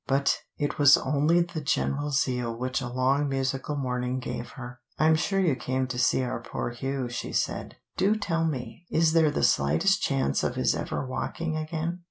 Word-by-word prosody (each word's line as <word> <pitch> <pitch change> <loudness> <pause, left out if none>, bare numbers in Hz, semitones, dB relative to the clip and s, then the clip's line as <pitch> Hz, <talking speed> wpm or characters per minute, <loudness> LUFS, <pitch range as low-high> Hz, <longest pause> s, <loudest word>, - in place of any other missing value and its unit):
But 135 +1 +2 0.2
it 145 0 -2
was 145 0 +8
only 150 +5 +2
the 170 -2 -3
general 145 0 0
zeal 125 -4 0
which 130 +2 -2
a 125 - -3
long 130 +4 +1
musical 135 +2 -2
morning 125 -2 -2
gave 120 -1 -5
her. 120 -1 -9 0.2
"I'm 155 +1 +4
sure 195 +4 0
you 170 -8 +2
came 130 +2 -1
to 125 -1 -3
see 125 +1 +3
our 120 -2 -3
poor 120 - -4
Hugh," 135 +1 -3
she 120 0 -5
said. - - -2 0.2
"Do 200 +3 +3
tell 165 -6 -1
me, 160 +4 -4
is 160 0 +3
there 160 -2 +5
the 145 - -1
slightest 70 +3 +3
chance 70 0 0
of - - -1
his - - +2
ever - - -3
walking 155 +5 -3
again?" 160 +2 -3
135 Hz, 190 wpm, -27 LUFS, 125-155 Hz, 0.2 s, was